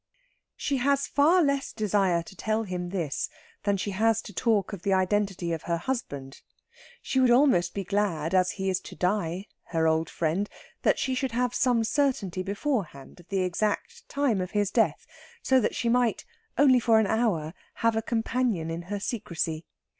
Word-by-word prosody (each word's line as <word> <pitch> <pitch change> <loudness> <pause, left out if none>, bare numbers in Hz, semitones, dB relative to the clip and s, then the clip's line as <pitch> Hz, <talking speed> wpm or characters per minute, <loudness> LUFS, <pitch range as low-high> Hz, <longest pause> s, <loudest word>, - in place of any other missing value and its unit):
She 280 - -1
has 280 +2 +2
far 330 +5 +4
less 280 -1 0
desire 195 -5 +1
to 190 - -13
tell 220 +3 -1
him 180 -3 -4
this 170 -7 -2 0.4
than 200 -1 +2
she 200 +2 -3
has 220 +3 +2
to 205 - -10
talk 210 0 +1
of 195 - -6
the 195 - +1
identity 190 -2 0
of 160 - -3
her 170 - +2
husband. 145 - -5 0.6
She 265 - 0
would 255 -1 +5
almost 240 -9 +4
be 200 - -2
glad, 190 -5 -1
as 185 -1 +3
he 195 -1 -3
is 185 -1 +1
to - - -11
die 185 -1 -1 0.2
her 160 -1 0
old 160 0 +1
friend 170 +5 -1 0.3
that - - +3
she 260 - -1
should 255 -1 -2
have 245 0 0
some 240 -2 +2
certainty 225 -7 0
beforehand 200 - -3
of 175 - -17
the 195 -1 0
exact 210 - -2
time 275 -9 +1
of 180 - -3
his 205 -1 0
death, - - +1 0.4
so 260 0 +4
that 235 - 0
she 235 - -1
might, 240 -1 +2 0.3
only 265 -3 +6
for 230 -2 +4
an 220 - +4
hour 195 -9 0 0.3
a 225 -1 +3
companion 225 -7 -1
in 165 +1 -4
her 205 -1 -2
secrecy. 170 -7 -3
205 Hz, 180 wpm, -27 LUFS, 180-240 Hz, 0.6 s, only